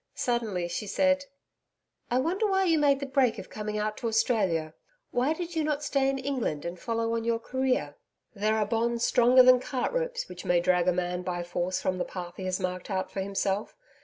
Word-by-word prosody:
Suddenly 220 -8 -1
she 175 +5 -4
said: 280 +4 +2 0.8
'I 245 - +1
wonder 375 +9 0
why 385 -1 +2
you 330 -4 +3
made 280 -2 +3
the - - -2
break 265 -3 +2
of - - -9
coming 210 0 -4
out 215 0 -2
to 235 - -3
Australia 195 -9 +1 0.4
why 250 +5 +1
you 350 +1 -4
did 330 -2 -2
not 300 -1 -1
stay 275 -2 +1
in 270 - -1
England 255 - -2
and 170 +1 -5
follow 230 +1 -1
on 230 0 -1
your 230 0 +1
career?' 260 +2 -1 0.4
'There 215 +1 +1
are 215 - +2
bonds 235 +2 0
stronger 250 +1 +6
than 255 0 +7
cart 255 - -2
ropes - - -2
which - - -9
may 175 -1 +3
drag 180 0 +2
a - - +5
man 180 0 -2
by 175 -1 -3
force 175 +1 -2
from 185 -1 -1
the - - +1
path 175 -2 -7
he 190 - -5
has 185 0 -1
marked 180 0 -4
out 190 -2 -2
for - - -4
himself. 195 +1 -2
230 Hz, 215 wpm, -28 LUFS, 185-270 Hz, 0.8 s, than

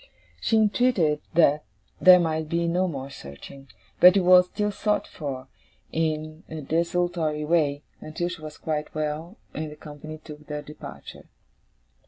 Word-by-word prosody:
She 225 - +2
entreated 210 -8 +2
that 150 -3 +4 0.4
there 185 -1 +8
might 160 -2 -1
be 170 +1 0
no 180 +2 +1
more 140 -4 -5
searching; 135 - -11 0.3
but 180 +2 +8
it - - +4
was 180 0 +6
still 210 +2 -1
sought 210 +1 0
for, 135 -4 -6 0.4
in 155 0 -2
a 160 - -6
desultory 165 0 0
way, 150 -3 +1 0.2
until 160 +3 -4
she 175 -2 -6
was 155 -1 -8
quite 155 -1 -3
well, 155 +5 -3 0.2
and 155 0 -4
the - - -9
company 150 +1 -9
took 150 -1 -12
their 150 -1 -5
departure. 150 +1 -11
155 Hz, 150 wpm, -25 LUFS, 150-175 Hz, 0.4 s, there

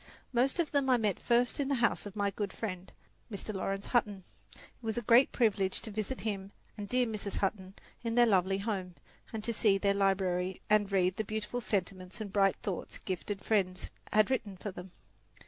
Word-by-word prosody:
Most 255 +6 +2
of 330 -3 +1
them 280 -2 +2
I 255 - +6
met 210 -5 0
first 240 +2 +2
in 280 - +1
the 280 - +1
house 240 -3 +1
of 200 - -10
my 200 -1 +1
good 200 0 -3
friend, 185 -4 -5 0.4
Mr. 210 +1 -4
Laurence 195 0 -2
Hutton. 205 -6 0 0.3
It - - -17 0.2
was 225 -1 -3
a 240 - -1
great 240 +5 +6
privilege 200 -5 +2
to 220 - -5
visit 215 +5 -3
him 200 -3 -3 0.2
and 205 -2 -6
dear 250 0 +3
Mrs. 210 -3 -4
Hutton 195 -1 -2 0.3
in 230 -1 -1
their 240 0 +7
lovely 195 -3 +3
home, 195 -4 -3 0.4
and 215 -1 -5
see 220 -3 +3
their 200 0 +2
library 190 -2 +1
and 205 -2 +4
read 185 -1 +2
the 220 - 0
beautiful 215 +3 -3
sentiments 185 -3 -3
and 205 -3 -6
bright 195 -2 +4
thoughts 190 -4 -4
gifted 195 +1 -4
friends 185 -4 0 0.2
had 215 +4 +4
written 210 -7 -1
for 205 - -5
them. 180 +1 -9
205 Hz, 195 wpm, -32 LUFS, 195-230 Hz, 0.4 s, their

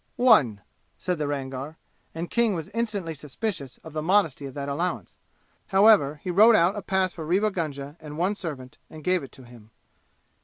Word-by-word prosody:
"One," 145 - +4 0.4
said 180 -3 -2
the 150 - -1
Rangar, 140 +2 -5 0.4
and 170 +1 -5
King 235 -4 +2
was 165 0 -5
instantly 210 -6 -2
suspicious 150 - -5
of 160 - -10
the 155 - -2
modesty 160 -5 +1
of 135 - -11
that 140 -1 -4
allowance; 170 +6 -3 0.5
however 190 -8 +5
he 180 - -2
wrote 220 +5 +7
out 175 0 +3
a 205 - -4
pass 190 -1 0
for 165 - -7
Rewa 195 +7 +1
Gunga 145 -4 -5
and 150 -1 -9
one 185 +5 +1
servant 145 -10 -7
and 155 -1 -11
gave 180 +1 +2
it 135 - -10
to 130 - -13
him. 120 -3 -16
165 Hz, 185 wpm, -25 LUFS, 140-195 Hz, 0.5 s, wrote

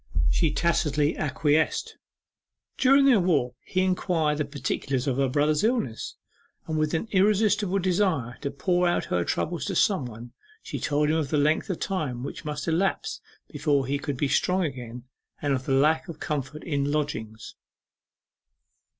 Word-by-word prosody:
She 160 -3 +2
tacitly 150 -3 +1
acquiesced. 150 +1 0 0.8
During 275 +1 +5
their 255 -6 +6
walk 155 -9 +1
he 185 - -1
inquired 170 -5 0
the 150 - +1
particulars 135 -2 -2
of 135 -3 0
her 135 -1 +2
brother's 150 +4 +2
illness, 220 - -1 0.5
and 160 - -3
with 155 +1 +1
an 165 - -2
irresistible 205 0 +3
desire 175 - 0
to 140 - -2
pour 175 +5 +1
out 175 - +1
her 90 - +2
trouble 170 - -2
to 195 - -3
some 185 -6 +2
one, 120 +1 -10 0.3
she - - -5
told 150 +1 +1
him 160 - +2
of 150 -4 -1
the 150 - +1
length 150 +5 +2
of 185 - -1
time 145 -11 -2
which 140 - -6
must 150 0 -4
elapse 170 +4 0 0.3
before 145 -2 0
he 140 +2 -1
could 145 -2 -4
be 145 - +1
strong 180 +7 +1
again, 125 -4 -6 0.4
and 145 -1 0
of 130 -1 -3
the 135 - +1
lack 155 +6 +3
of 165 -3 -8
comfort 150 0 -4
in 145 -3 -1
lodgings. 125 -8 -3
150 Hz, 165 wpm, -26 LUFS, 140-180 Hz, 0.8 s, their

